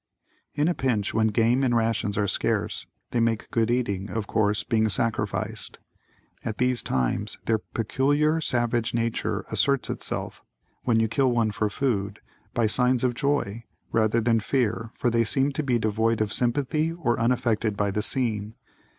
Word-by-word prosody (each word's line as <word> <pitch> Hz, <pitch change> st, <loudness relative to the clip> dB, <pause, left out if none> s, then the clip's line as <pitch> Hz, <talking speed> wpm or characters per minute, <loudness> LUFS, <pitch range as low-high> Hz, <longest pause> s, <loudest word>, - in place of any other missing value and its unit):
In 150 Hz, +1 st, +2 dB
a 175 Hz, -, +2 dB
pinch, 120 Hz, -10 st, -1 dB
when 110 Hz, 0 st, +3 dB
game 115 Hz, +4 st, +2 dB
and 120 Hz, -2 st, +2 dB
rations 110 Hz, -3 st, 0 dB
are 105 Hz, -, +2 dB
scarce, -, -, -1 dB, 0.2 s
they 120 Hz, -, +1 dB
make 115 Hz, -1 st, 0 dB
good 115 Hz, -1 st, +1 dB
eating, 105 Hz, -5 st, -1 dB
of 110 Hz, -2 st, -3 dB
course, 105 Hz, -1 st, +1 dB
being 110 Hz, -2 st, +1 dB
sacrificed. 105 Hz, 0 st, -2 dB, 0.7 s
At 110 Hz, -2 st, -4 dB
these 125 Hz, -1 st, +1 dB
times, 65 Hz, -2 st, -1 dB
their 110 Hz, -1 st, +2 dB
peculiar 145 Hz, +9 st, +1 dB
savage 120 Hz, -4 st, 0 dB
nature 115 Hz, -1 st, -1 dB
asserts 140 Hz, -2 st, +1 dB
itself, -, -, -3 dB, 0.4 s
when 115 Hz, -3 st, +3 dB
you 115 Hz, -, +2 dB
kill 130 Hz, +4 st, +2 dB
one 115 Hz, -3 st, +1 dB
for 105 Hz, 0 st, -1 dB
food, 105 Hz, -5 st, -1 dB, 0.4 s
by 115 Hz, -, +2 dB
signs 125 Hz, +3 st, +2 dB
of 125 Hz, -1 st, +2 dB
joy, 120 Hz, -5 st, -1 dB, 0.3 s
rather 110 Hz, 0 st, +2 dB
than 115 Hz, 0 st, +2 dB
fear 115 Hz, -1 st, -1 dB
for 120 Hz, -, 0 dB
they 115 Hz, 0 st, +3 dB
seem 135 Hz, +5 st, +1 dB
to 145 Hz, -, -1 dB
be 130 Hz, -5 st, +1 dB
devoid 110 Hz, +1 st, +1 dB
of 110 Hz, -1 st, 0 dB
sympathy 145 Hz, +6 st, +1 dB
or 140 Hz, -10 st, -1 dB
unaffected 115 Hz, -3 st, +1 dB
by 100 Hz, -1 st, +1 dB
the 105 Hz, -, -1 dB
scene. 110 Hz, -2 st, -1 dB
115 Hz, 165 wpm, -26 LUFS, 110-125 Hz, 0.7 s, when